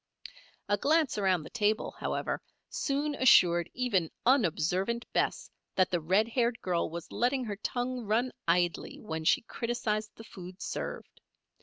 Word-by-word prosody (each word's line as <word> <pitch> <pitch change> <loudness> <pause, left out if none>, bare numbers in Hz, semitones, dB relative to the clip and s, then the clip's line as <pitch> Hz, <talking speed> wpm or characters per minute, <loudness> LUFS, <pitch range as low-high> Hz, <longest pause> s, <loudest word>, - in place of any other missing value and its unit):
A 205 -1 +1
glance 305 -4 +2
around 185 -5 +2
the - - -11
table, 215 -1 +1
however, - - -2 0.3
soon 290 +1 -1
assured 175 - +5
even 205 -10 +1 0.2
unobservant 215 - +2
Bess - - 0 0.2
that 185 -1 +3
the 175 -2 +1
red 190 +7 +3
haired 235 0 +1
girl 175 -2 -1
was 170 0 -7
letting 250 +1 +1
her 205 -3 -4
tongue 245 +1 -3
run 235 +4 +1 0.2
idly 175 0 +1
when 160 -6 -5
she - - +4
criticised 220 -3 -2
the 225 - -11
food 185 -3 -11
served. - - -6
215 Hz, 145 wpm, -30 LUFS, 180-245 Hz, 0.3 s, assured